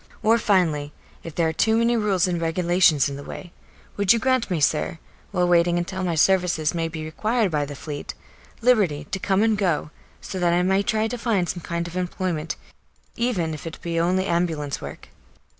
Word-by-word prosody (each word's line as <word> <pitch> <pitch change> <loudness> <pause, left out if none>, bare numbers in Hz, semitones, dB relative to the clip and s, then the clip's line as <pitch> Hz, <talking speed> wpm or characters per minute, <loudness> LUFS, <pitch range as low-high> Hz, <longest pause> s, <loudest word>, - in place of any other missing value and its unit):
Or, 225 +2 +4
finally, 160 -9 +1 0.3
if 165 - -9
there 165 -2 +2
are 160 - -1
too 220 +7 +2
many 230 +1 +3
rules 205 -5 +2
and 175 -2 -1
regulations 170 -2 +3
in 140 -1 -5
the 140 - -8
way, 175 - -9 0.4
would 200 -2 +4
you 235 - +5
grant 255 0 +1
me, 175 -4 0
sir, 150 +2 +1 0.3
while 180 -3 +1
waiting 175 0 +3
until 180 +2 -3
my 175 -2 0
services 175 -2 +2
may 165 -1 -1
be 160 -1 -6
required 215 +5 0
by 150 -2 0
the 145 0 -8
Fleet, 145 +1 -6 0.5
liberty 205 -12 +3
to 195 - -2
come 195 +2 +1
and 220 -1 +3
go, 175 -7 0 0.3
so 190 - -6
that 175 -1 +2
I 175 +1 +2
may 190 +2 +2
try 215 +2 0
to 240 +2 -5
find 215 -7 +1
some 175 - -4
kind 170 +1 -3
of 170 - -9
employment, 180 -3 -2 0.6
even 205 -10 -1
if 155 +2 -7
it 160 - -8
be 170 -1 -1
only 185 +3 +1
ambulance 165 -5 -1
work? - - -9
175 Hz, 200 wpm, -23 LUFS, 165-200 Hz, 0.6 s, you